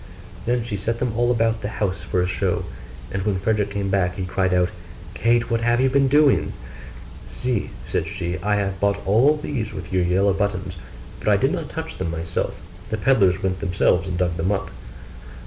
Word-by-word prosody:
Then 120 Hz, -1 st, +1 dB
she 105 Hz, -3 st, -4 dB
set 115 Hz, +4 st, -2 dB
them 120 Hz, -2 st, -1 dB
all 120 Hz, +1 st, +2 dB
about 115 Hz, -2 st, +1 dB
the -, -, -2 dB
house 95 Hz, -4 st, -1 dB
for 90 Hz, 0 st, 0 dB
a -, -, 0 dB
show: 90 Hz, -, -1 dB, 0.5 s
and 100 Hz, -, -2 dB
when 100 Hz, -1 st, 0 dB
Frederick 105 Hz, +1 st, 0 dB
came 100 Hz, -1 st, -2 dB
back, 90 Hz, -2 st, +1 dB
he 95 Hz, -, -3 dB
cried 95 Hz, 0 st, 0 dB
out, 90 Hz, -1 st, +3 dB, 0.4 s
'Kate, 115 Hz, 0 st, +2 dB
what 115 Hz, 0 st, +1 dB
have 120 Hz, +1 st, +2 dB
you 130 Hz, 0 st, +3 dB
been 135 Hz, 0 st, +4 dB
doing?' 145 Hz, +1 st, +4 dB, 0.7 s
'See,' 125 Hz, -4 st, -2 dB, 0.2 s
said -, -, -1 dB
she, 90 Hz, -2 st, -3 dB
'I 105 Hz, +3 st, +1 dB
have 95 Hz, -2 st, -1 dB
bought 100 Hz, +1 st, 0 dB
all 125 Hz, +10 st, +4 dB
these 130 Hz, -7 st, -3 dB
with 95 Hz, -1 st, -7 dB
your 95 Hz, -, +3 dB
yellow 95 Hz, +3 st, +3 dB
buttons: 95 Hz, -2 st, -2 dB, 0.4 s
but -, -, -8 dB
I -, -, +5 dB
did -, -, +2 dB
not -, -, -3 dB
touch -, -, -6 dB
them 95 Hz, -3 st, -1 dB
myself; 80 Hz, 0 st, -3 dB, 0.3 s
the 110 Hz, -, -1 dB
pedlars 100 Hz, -5 st, +3 dB
went 95 Hz, -1 st, 0 dB
themselves 90 Hz, -2 st, +2 dB
and 90 Hz, -2 st, -2 dB
dug 90 Hz, -2 st, 0 dB
them 90 Hz, +5 st, 0 dB
up. 100 Hz, -, -2 dB
100 Hz, 200 wpm, -23 LUFS, 95-115 Hz, 0.7 s, I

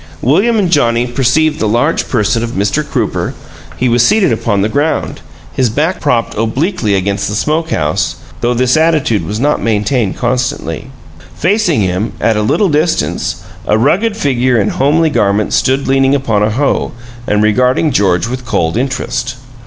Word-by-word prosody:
William 195 Hz, -, +2 dB
and 190 Hz, -5 st, +1 dB
Johnnie 120 Hz, -6 st, +2 dB
perceived 135 Hz, +5 st, +1 dB
the 110 Hz, -, 0 dB
large 120 Hz, +9 st, 0 dB
person 115 Hz, -1 st, +1 dB
of 120 Hz, 0 st, -4 dB
Mr. 105 Hz, +10 st, 0 dB
Crooper; 145 Hz, -, -2 dB, 0.4 s
he 125 Hz, -, 0 dB
was 120 Hz, 0 st, +3 dB
seated 205 Hz, -, +3 dB
upon 105 Hz, -3 st, 0 dB
the -, -, +2 dB
ground, 145 Hz, +7 st, -1 dB, 0.3 s
his 125 Hz, +5 st, +1 dB
back 155 Hz, -, -1 dB
propped 125 Hz, -6 st, 0 dB
obliquely 115 Hz, -, -1 dB
against 100 Hz, +1 st, -1 dB
the 105 Hz, -, -3 dB
smoke 155 Hz, +8 st, -1 dB
house, 75 Hz, -, -1 dB, 0.2 s
though 120 Hz, +1 st, 0 dB
this 125 Hz, +1 st, +2 dB
attitude 155 Hz, -9 st, +2 dB
was 105 Hz, +2 st, -4 dB
not 145 Hz, +4 st, +1 dB
maintained 110 Hz, 0 st, 0 dB
constantly. 125 Hz, +1 st, -2 dB, 0.5 s
Facing 180 Hz, -, +1 dB
him, 95 Hz, +4 st, -1 dB
at 115 Hz, -, +1 dB
a 105 Hz, -, 0 dB
little 185 Hz, -, +1 dB
distance, 150 Hz, -, -1 dB, 0.2 s
a -, -, +3 dB
rugged 200 Hz, -, +1 dB
figure 130 Hz, -, +1 dB
in 105 Hz, -, +1 dB
homely 155 Hz, +4 st, +1 dB
garments 100 Hz, -2 st, +1 dB
stood 135 Hz, +1 st, 0 dB
leaning 135 Hz, +1 st, +3 dB
upon 115 Hz, -7 st, 0 dB
a 105 Hz, -, +2 dB
hoe 135 Hz, +6 st, -1 dB, 0.3 s
and 105 Hz, 0 st, +1 dB
regarding 125 Hz, +8 st, +2 dB
George 95 Hz, -4 st, +1 dB
with 125 Hz, +2 st, -4 dB
a -, -, -15 dB
cold 100 Hz, -5 st, -1 dB
interest. 125 Hz, 0 st, -2 dB
125 Hz, 170 wpm, -13 LUFS, 110-150 Hz, 0.5 s, was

